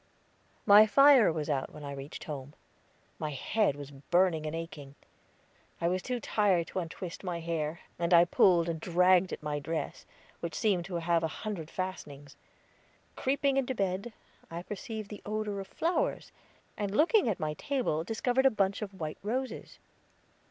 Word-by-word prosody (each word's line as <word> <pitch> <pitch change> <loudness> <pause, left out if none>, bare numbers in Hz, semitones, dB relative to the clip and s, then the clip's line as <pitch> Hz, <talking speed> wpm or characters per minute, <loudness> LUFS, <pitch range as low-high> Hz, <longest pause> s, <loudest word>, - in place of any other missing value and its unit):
'" - - -37 0.2
My 210 +2 +8
fire 270 -1 +7
was 155 -2 -3
out 140 -3 -1
when 150 - -10
I 140 - -5
reached 140 +1 -7
home. 145 -1 -7 0.6
My 155 - -2
head 150 - 0
was 145 -1 -9
burning 160 +3 +1
and 155 - -3
aching. 150 -4 -7 0.8
I 170 - +1
was 185 +1 0
too 250 +5 -3
tired 200 -6 +2
to - - -3
untwist 170 +1 -6
my 175 -3 -3
hair, 165 -1 -3 0.2
and 170 0 0
I 170 0 +7
pulled 175 -1 +4
and 165 -1 -2
dragged 180 +2 +3
at - - -6
my 150 -1 -2
dress, 160 +3 -4 0.3
which 170 -2 -5
seemed 190 -5 +1
to 185 -1 -6
have 170 0 +1
a 160 - 0 0.2
hundred 180 -8 -4
fastenings. 145 -7 -6 0.8
Creeping 275 +1 +1
into 260 -1 0
bed, 195 +3 -2 0.4
I 170 +1 -6
perceived 215 +1 -6
the 210 - -8
odor 210 -1 -3
of 195 - -6
flowers, 355 - -1 0.4
and 205 0 -2
looking 355 - +4
at 205 - -1
my 155 -1 -1
table 245 - -1
discovered 245 +7 +2
a - - +6
bunch 200 -3 0
of 195 -2 -7
white 155 -2 -4
roses. 250 +6 -4
180 Hz, 170 wpm, -30 LUFS, 160-215 Hz, 0.8 s, My